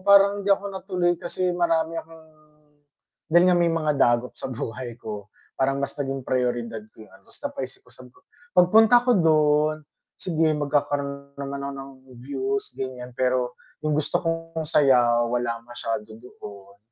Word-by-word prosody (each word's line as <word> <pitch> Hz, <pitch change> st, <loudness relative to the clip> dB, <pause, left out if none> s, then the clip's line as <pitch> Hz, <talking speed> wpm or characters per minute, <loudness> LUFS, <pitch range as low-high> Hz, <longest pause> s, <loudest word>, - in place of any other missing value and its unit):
parang 200 Hz, +1 st, +5 dB
hindi 200 Hz, -, -4 dB
ako 200 Hz, 0 st, +3 dB
natuloy 185 Hz, -2 st, 0 dB
kasi 180 Hz, +1 st, -1 dB
marami 165 Hz, -2 st, +1 dB
akong 160 Hz, 0 st, -16 dB, 1.1 s
dahil 175 Hz, +2 st, +6 dB
nga 180 Hz, -, +4 dB
may 170 Hz, -1 st, +3 dB
mga 155 Hz, -2 st, +1 dB
dagok 120 Hz, 0 st, +3 dB
sa -, -, -5 dB
buhay 120 Hz, -1 st, -5 dB
ko, 105 Hz, -3 st, -7 dB, 0.3 s
parang 135 Hz, +1 st, +1 dB
mas 140 Hz, -, -2 dB
naging 135 Hz, -2 st, -3 dB
priyoridad 120 Hz, -3 st, -1 dB
ko 110 Hz, -, -13 dB
'yung 100 Hz, -, -21 dB
ano, 95 Hz, -, -23 dB
ta's -, -, -10 dB
napaisip -, -, -5 dB
ako, -, -, -22 dB
sabi 125 Hz, 0 st, -12 dB
ko, -, -, -21 dB, 0.4 s
"Pagpunta 220 Hz, +7 st, +6 dB
ko 250 Hz, -, +2 dB
don, 155 Hz, -2 st, +3 dB, 0.4 s
sige 165 Hz, -3 st, +1 dB
magkakaroon 140 Hz, -1 st, -2 dB
naman 140 Hz, 0 st, -5 dB
ako -, -, -5 dB
ng 135 Hz, 0 st, -8 dB, 0.3 s
views," 405 Hz, -, -2 dB
ganiyan. 125 Hz, -1 st, -6 dB
Pero 125 Hz, 0 st, 0 dB, 0.3 s
'yung 155 Hz, -, +1 dB
gusto 155 Hz, +3 st, 0 dB
kong 165 Hz, -1 st, -2 dB
saya 125 Hz, -6 st, +4 dB
wala 120 Hz, -1 st, -1 dB
masyado 115 Hz, -3 st, -4 dB
doon. 100 Hz, -4 st, -12 dB
140 Hz, 160 wpm, -24 LUFS, 125-170 Hz, 1.1 s, dahil